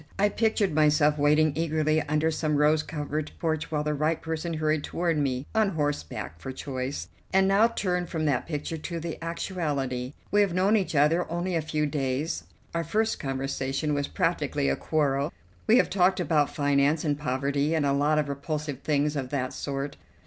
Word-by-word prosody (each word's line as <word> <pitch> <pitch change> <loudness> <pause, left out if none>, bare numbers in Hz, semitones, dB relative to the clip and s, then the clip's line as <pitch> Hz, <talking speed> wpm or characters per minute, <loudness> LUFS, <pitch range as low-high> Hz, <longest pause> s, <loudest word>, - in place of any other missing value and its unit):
I 205 +1 +3
pictured 215 -4 +1
myself 150 -1 +3
waiting 150 +1 +4
eagerly 155 -1 +1
under 150 +2 +1
some 155 -1 0
rose 150 +1 +4
covered 150 0 -4
porch 160 -1 -1
while 150 -2 -1
the 150 0 0
right 155 +2 0
person 160 +1 -3
hurried 155 -1 0
toward 170 -1 -1
me, 135 -3 -1
on 215 -5 +2
horseback 145 - -3
for 130 - -6
choice. 130 0 -4 0.2
And 190 0 +4
now 200 +4 +5
turn 180 -6 -1
from 160 -2 -2
that 135 -5 0
picture 160 +1 -4
to 170 +2 -4
the 165 0 -6
actuality. 145 -7 -2 0.2
We 205 - +4
have 195 -4 +1
known 195 +4 +3
each 190 -6 0
other 155 +5 +3
only 175 +2 -1
a 165 - +1
few 155 0 -1
days; 140 +1 -2 0.3
our 170 0 0
first 220 +7 0
conversation 135 +2 -2
was 145 -1 0
practically 70 - 0
a 70 - +2
quarrel; 140 - 0 0.4
we 225 - +6
have - - +4
talked 190 -1 +3
about 150 -4 +2
finance, 145 +2 +2
and 145 -1 +2
poverty, 140 +2 0
and 155 -3 +1
a 140 - +2
lot 145 +2 +2
of 150 -1 +1
repulsive 145 0 -4
things 150 0 0
of 135 -3 -3
that 130 -2 -2
sort. 140 0 -4
150 Hz, 185 wpm, -27 LUFS, 145-165 Hz, 0.4 s, we